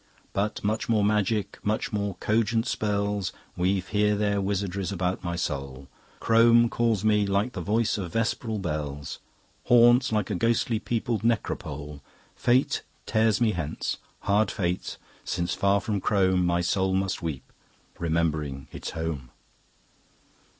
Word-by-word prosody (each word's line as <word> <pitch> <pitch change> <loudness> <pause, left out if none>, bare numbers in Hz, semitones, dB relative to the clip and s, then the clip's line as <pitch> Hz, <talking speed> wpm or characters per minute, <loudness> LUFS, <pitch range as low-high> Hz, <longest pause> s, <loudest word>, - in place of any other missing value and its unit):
But 105 +2 -1
much 110 +3 -1
more 110 -2 +3
magic, 105 -1 0
much 110 +1 -1
more 100 -2 -1
cogent 115 +1 +1
spells 100 -2 -1 0.2
Weave 90 +1 0
here 105 0 +2
their 100 -1 +1
wizardries 100 -1 -2
about 90 -1 -2
my 85 -1 -2
soul. 70 -4 -4 0.3
Crome 115 +1 +5
calls 115 -4 +1
me 105 -1 +3
like 100 +5 0
the 90 - -4
voice 105 +4 +1
of 90 -4 -5
vesperal 115 0 -1
bells, 75 -6 -4 0.5
Haunts 120 +1 +6
like 105 -1 0
a - - 0
ghostly 115 +2 +1
peopled 115 0 -1
necropole. 75 -10 -2 0.3
Fate 125 +3 +2 0.2
tears 110 -1 +2
me 115 -3 +3
hence. 80 -5 -3 0.2
Hard 100 +1 +2
fate! 90 -2 -2 0.3
since 85 0 -2
far 100 0 +2
from 100 -1 -2
Crome 95 -3 +2
My 85 0 +2
soul 95 +2 +1
must 95 0 -1
weep, 75 -6 -5 0.5
remembering 80 -5 -1
its - - -6
Home." 80 -6 -3
100 Hz, 135 wpm, -26 LUFS, 85-110 Hz, 0.5 s, Haunts